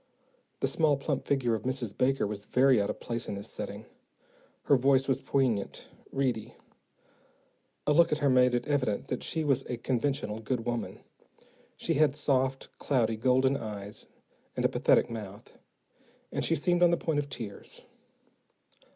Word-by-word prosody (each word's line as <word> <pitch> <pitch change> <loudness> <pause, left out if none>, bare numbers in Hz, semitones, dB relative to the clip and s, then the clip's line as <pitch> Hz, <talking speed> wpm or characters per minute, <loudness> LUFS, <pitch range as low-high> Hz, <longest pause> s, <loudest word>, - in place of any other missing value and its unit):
The - - +2
small, 155 -3 +2
plump 140 0 -2
figure 130 -4 +1
of 110 - -1
Mrs. 125 -4 -3
Baker 135 -1 +1
was 105 0 -5
very 130 -1 +4
out 100 - -1
of - - -4
place 115 -1 -4
in - - -3
this 100 - -7
setting. - - -6 0.8
Her 140 - +4
voice 135 +1 +3
was 135 - 0
poignant, 125 -7 -1 0.2
reedy. 130 -5 -2 1.3
A 150 - +3
look 170 +2 +5
at 150 - +2
her 145 -2 +1
made 125 -1 +4
it 120 - -1
evident 130 -8 -1
that 125 - -2
she 160 - -2
was 140 -4 +2
a 125 - -2
conventional, 120 -2 -1
good 115 +1 -3
woman. 120 -1 -3 0.8
She - - -1
had 145 -1 +3
soft, 135 -2 0
cloudy 115 -5 +1
golden 130 +4 +2
eyes 105 -4 -7 0.5
and - - -1
a - - +5
pathetic - - +3
mouth, 105 -2 -8 0.8
and - - -2
she - - +1
seemed 175 +4 +1
on 175 - +7
the 170 - +2
point 160 -3 -1
of 145 -1 -4
tears. 110 -7 -8
130 Hz, 165 wpm, -29 LUFS, 115-140 Hz, 1.3 s, on